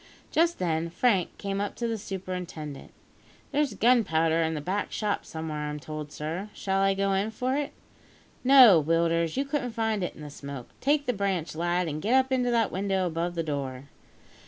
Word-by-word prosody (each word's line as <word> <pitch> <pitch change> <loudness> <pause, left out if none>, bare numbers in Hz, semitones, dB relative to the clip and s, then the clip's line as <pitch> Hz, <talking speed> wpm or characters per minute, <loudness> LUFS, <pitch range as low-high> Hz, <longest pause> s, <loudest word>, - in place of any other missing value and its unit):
Just 335 +2 +2
then, 165 -2 -1
Frank 190 0 +1
came 200 0 -2
up 205 - -3
to 235 - -2
the 230 - -1
superintendent. 180 -7 -6 0.6
"There's 285 -6 +1
gunpowder 165 -9 +3
in 160 0 0
the - - -2
back 185 +7 -2
shop 210 -2 -1
somewhere, 155 -2 -4
I'm 150 0 -5
told, 155 0 -7
sir; 165 +8 -4
shall 195 0 0
I 195 0 +3
go 195 0 +1
in 195 +3 +1
for 255 +4 -1
it?" 290 0 -2 0.7
"No, 250 - +8
Willders; 165 - +1
you 275 - +1
couldn't 275 -4 -2
find 220 -2 0
it 180 - -3
in - - -12
the 150 -1 -8
smoke. 140 -3 -8
Take 290 +1 +2
the 250 - +1
branch, 195 -5 -1
lad, 175 +2 0
and 155 0 -3
get 230 +8 +2
up 265 0 +3
into 250 -1 +2
that 230 -3 +2
window 190 0 0
above 170 +1 -2
the 165 - -1
door." 140 -3 -4
185 Hz, 190 wpm, -27 LUFS, 160-225 Hz, 0.7 s, No